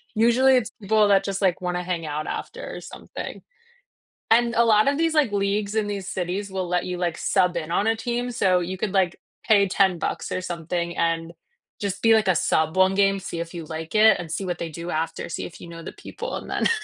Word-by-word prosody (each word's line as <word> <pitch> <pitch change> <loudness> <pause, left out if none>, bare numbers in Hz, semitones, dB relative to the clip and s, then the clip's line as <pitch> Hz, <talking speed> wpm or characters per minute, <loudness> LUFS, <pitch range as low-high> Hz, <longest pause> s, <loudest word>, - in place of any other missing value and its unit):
usually 245 +4 +5
it's 225 - -1
people 210 +1 +3
that 195 -1 +5
just, 195 0 -3
like, 185 -2 +1
wanna 180 0 -2
hang 175 -3 -3
out 150 +1 -3
after - - -6
or - - -7
something. - - -8 0.9
And 235 0 +4
a 235 - +5
lot 215 +2 +4
of 280 +1 +2
these, 330 0 +1
like, 290 -8 +3
leagues 200 +1 0
in 215 -1 +1
these 200 -2 -4
cities 190 +3 -3
will 185 -2 -2
let 180 0 0
you, 180 -1 -3
like, 175 -2 -1
sub 180 -2 +2
in 165 -1 -3
on 200 +4 +1
a 225 0 +2
team, 245 +2 -2
so 185 -5 +2
you 185 +2 -4
could, 205 -2 -2
like, 185 -3 +2 0.3
pay 200 -3 +5
10 190 -2 +2
bucks - - -3
or 185 - -1
something, 170 0 -3
and 165 0 0 0.5
just 200 -1 -3
be, 225 0 +5
like, 215 -3 +3
a 180 - +4
sub 160 +3 +1
one 190 +1 +4
game, 195 -1 +3
see 170 -2 -6
if 170 +1 -7
you 165 -2 -6
like 160 +2 -6
it, 215 -1 +6
and 165 -2 -6
see 190 +3 -2
what 175 - -2
they 170 - -4
do 170 +3 -7
after, 160 0 -2
see - - -4
if - - -10
you - - -10
know 165 0 -9
the - - -7
people, - - -7
and - - -7
then - - +1
190 Hz, 240 wpm, -24 LUFS, 170-210 Hz, 0.9 s, it